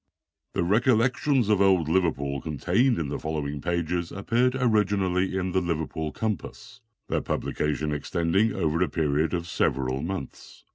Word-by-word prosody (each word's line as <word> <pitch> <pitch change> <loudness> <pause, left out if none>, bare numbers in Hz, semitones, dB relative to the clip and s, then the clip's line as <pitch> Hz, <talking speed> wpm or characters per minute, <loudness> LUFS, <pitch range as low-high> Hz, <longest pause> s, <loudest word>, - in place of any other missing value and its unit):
The - - 0
"Recollections 125 - +2
of 105 -2 +3
Old 95 -5 +4
Liverpool," 75 -5 0
contained 90 - +1
in 80 -4 -2
the - - -3
following 75 -2 -3
pages, 85 0 -1
appeared 120 +6 +1
originally 100 -6 +2
the 95 0 -1
Liverpool 80 -2 -2
Compass, 105 -4 -5 0.3
their - - 0
publication 75 0 -2
extending 85 +8 +1
over 80 -3 0
a 90 - +2
period 80 +1 0
of 85 -1 -3
several 65 -4 0
months. 85 -4 -7
85 Hz, 135 wpm, -26 LUFS, 75-100 Hz, 0.3 s, Old